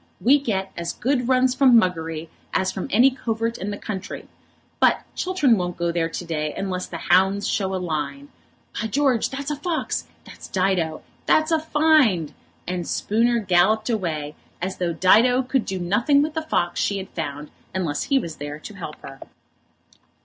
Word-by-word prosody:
We 275 +5 +5
get 195 -8 -2
as 170 0 -4
good 250 -1 0
runs 255 0 +3
from 255 -3 +6
Muggery 165 -4 -2 0.3
as 190 0 +1
from 190 - -5
any 250 +6 +5
covert 230 -2 -3
in 195 - -3
the 205 - -4
country. 200 -3 -6 0.5
But - - +3
Chiltern 305 -11 +2
won't 175 -1 -3
go 170 0 0
there 165 -1 0
to 175 - -6
day 155 -2 -3
unless 185 -2 -3
the 170 - -6
hounds 190 +4 +2
show 190 -2 -1
a - - 0
line. 180 - -4 0.5
By 220 - -1
George, 260 0 +1
that's 275 +2 -4
a - - -1
fox! 320 +3 -2 0.2
That's - - -11
Dido. 185 -4 0 0.2
That's 310 +1 +3
a 320 - +3
find!" 300 - +3 0.3
And 175 -1 -3
Spooner 235 +3 +1
galloped 215 +4 +2
away, 155 -8 -2 0.3
as 185 +2 -4
though 175 -2 0
Dido 225 +10 +4
could 255 -1 0
do 190 - -3
nothing 235 +11 +2
with 305 0 -3
the 320 - -1
fox 180 - -1
she 200 - 0
had 190 -1 -6
found 150 -2 -5 0.2
unless 165 -6 -1
he 275 - +2
was 165 -11 -3
there 145 +1 -6
to 185 +7 -10
help 170 -6 -7
her. 135 0 -10
195 Hz, 180 wpm, -23 LUFS, 175-255 Hz, 0.5 s, from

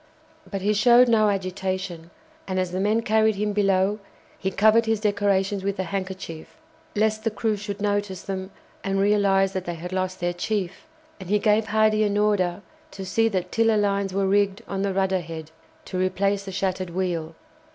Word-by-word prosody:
But 195 -2 -4
he 210 +1 +2
showed 240 +4 +6
no 215 -2 +4
agitation, 185 -3 -3 0.4
and 185 -1 -1
as 185 -1 -1
the 185 - -2
men 215 +4 +1
carried 220 0 +3
him 210 +1 -1
below 195 0 +2 0.4
he 190 - -2
covered 220 +3 +4
his 225 -1 +1
decorations 200 -2 +1
with 200 0 -2
a 190 - -1
handkerchief, 185 -3 -6 0.4
lest 215 +1 +1
the 225 - +1
crew 220 0 -1
should 205 0 -6
notice 205 -2 -1
them 190 -1 -4 0.3
and 195 0 0
realize 195 -1 +3
that 185 -1 -3
they 175 - -3
had 180 +3 -7
lost 185 0 -2
their 175 -1 -1
chief, 190 0 -3 0.3
and 185 -2 -9
he 210 - +4
gave 215 +1 +2
Hardy 215 0 +3
an 205 -1 +1
order 205 -3 +1 0.3
to 195 -8 -8
see 225 +4 +2
that 185 -3 -2
tiller 225 -1 +3
lines 200 -1 0
were 195 +1 0
rigged 200 +2 +1
on 195 -1 -3
the 200 0 0
rudder 190 0 +1
head, 160 -1 -8 0.3
to 185 - -4
replace 195 +2 0
the 195 - -6
shattered 185 -1 -2
wheel. 170 -3 -3
195 Hz, 185 wpm, -24 LUFS, 185-210 Hz, 0.4 s, showed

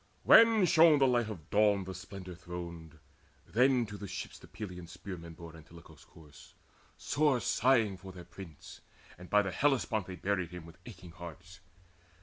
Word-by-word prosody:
When 225 -3 +7
shone 160 -2 +6
the 135 - +4
light 120 -3 +1
of 85 -7 -9
Dawn 105 -2 +3
the 95 0 -7
splendour 95 0 -9
throned, 85 -2 -9 0.5
Then 125 +1 +2
to 105 -2 -9
the 100 - -7
ships 90 -2 -7
the - - -15
Pylian 90 -5 -8
spearmen 85 -2 -9
bore 85 0 -11
Antilochus' 80 -1 -15
corpse, 75 -3 -17 0.4
sore 145 -4 +1
sighing 115 -5 +2
for 95 0 -11
their 90 -2 -11
prince, 85 -3 -12 0.4
And 90 - -12
by 105 0 +4
the 95 - -3
Hellespont 120 -4 0
they 95 - -7
buried 95 -2 -2
him 90 -2 -9
With 85 +2 -15
aching 95 -6 -11
hearts. 85 +3 -11
95 Hz, 165 wpm, -31 LUFS, 85-110 Hz, 0.5 s, When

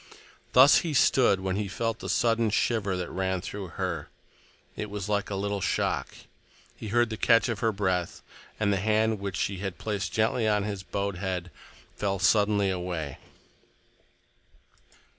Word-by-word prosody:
Thus 130 +4 +8
he 160 -4 -1
stood 120 -8 +4
when 95 0 -1
he 105 -1 -2
felt 115 +4 -2
the - - -6
sudden 115 -1 +2
shiver 105 -3 0
that 90 -1 -4
ran 95 0 -1
through 100 +1 -6
her. 90 -6 -3 0.7
It 105 - -5
was 100 -1 -5
like 105 0 -1
a 100 - -3
little 100 0 -2
shock. - - -1 0.6
He - - -8
heard 120 +2 +2
the 110 - -4
catch 115 0 +4
of 115 -3 -2
her 115 +1 +1
breath, 95 -4 -2 0.4
and 100 -2 +2
the - - +1
hand 110 +2 +1
which 100 -1 -4
she 100 -1 -1
had 95 -2 -4
placed 105 -3 -3
gently 110 +1 +1
on 105 -1 +2
his 100 -2 -4
bowed 100 -1 -3
head 90 -2 -3 0.4
fell 100 -1 -1
suddenly 100 +1 +3
away. 90 -6 -4
100 Hz, 160 wpm, -27 LUFS, 95-110 Hz, 0.7 s, Thus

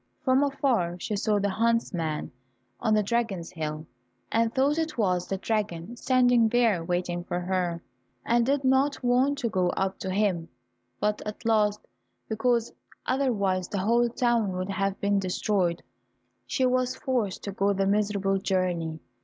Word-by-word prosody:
From 260 0 +3
afar 260 -11 +1
she 210 - -3
saw 210 +1 +1
the 200 0 0
huntsman 190 -10 0 0.5
on 220 -2 +2
the 210 - +3
dragon's 205 -6 -1
hill, 155 -2 -4 0.5
and 230 0 +2
thought 280 +5 +2
it 320 -3 -2
was 180 -5 +1
the 195 - -2
dragon 205 -1 -2
standing 245 -2 +3
there 225 -7 +2
waiting 175 0 -2
for 175 0 -3
her, 180 -2 -1 0.4
and 235 0 +3
did 275 +3 +1
not 265 +1 +2
want 255 +4 +2
to 245 - -1
go 185 -3 +1
up 190 0 -1
to 190 - -4
him, 185 -4 0 0.5
but 210 0 0
at 210 +2 -7
last, 210 -2 +2 0.5
because 235 +1 0 0.3
otherwise 200 -9 0
the 205 - -4
whole 235 +5 +2
town 235 -4 +1
would 185 +2 -3
have 195 0 -1
been 200 0 +2
destroyed, 185 -2 0 0.6
she 260 - +1
was 255 0 +1
forced 240 -9 -2
to 200 - -4
go 200 +1 +1
the 195 0 0
miserable 200 -1 +1
journey. 175 -4 -1
210 Hz, 155 wpm, -27 LUFS, 185-240 Hz, 0.6 s, From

